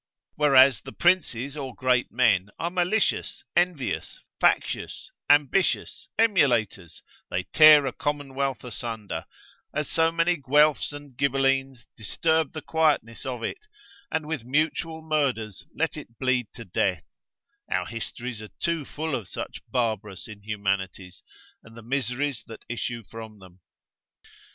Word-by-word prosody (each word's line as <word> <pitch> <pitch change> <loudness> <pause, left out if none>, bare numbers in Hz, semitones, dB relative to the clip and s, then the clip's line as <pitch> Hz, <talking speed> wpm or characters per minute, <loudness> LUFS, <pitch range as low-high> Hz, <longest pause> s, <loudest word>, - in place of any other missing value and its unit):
Whereas 135 -6 +6
the - - -10
princes 145 -7 +1
or 135 -4 -6
great 125 -1 +1
men 105 -6 +3
are 170 +1 -2
malicious, 185 +4 0
envious, 175 -8 0 0.2
factious, - - 0 0.2
ambitious, 145 +5 +2
emulators, 120 - +2 0.3
they 90 - -1
tear 155 -2 +9
a 130 - -2
commonwealth 140 -3 -2
asunder, 115 -3 -5 0.5
as 150 -2 -1
so 165 0 +2
many 165 +1 +2
Guelfs 145 +2 +3
and 145 -3 -10
Gibelines 135 -2 +1
disturb 160 - 0
the 155 - -6
quietness 145 -7 +1
of 125 -3 -4
it, - - -3 0.5
and 160 -1 -1
with 155 -6 -3
mutual 160 +4 -1
murders 135 -10 -1
let - - 0
it 115 - -10
bleed 125 -3 +1
to 115 - -9
death; 90 -3 0 0.7
our - - +1
histories 115 0 -5
are 105 - -9
too 170 -2 0
full 160 +2 -4
of 115 -8 -2
such - - -6
barbarous 110 -5 -2
inhumanities, 100 -3 -3 0.4
and 115 +1 -15
the 115 - -10
miseries 130 0 -1
that 115 - -11
issue 120 0 -4
from 110 0 -10
them. 95 -2 -16
130 Hz, 130 wpm, -26 LUFS, 115-150 Hz, 0.7 s, tear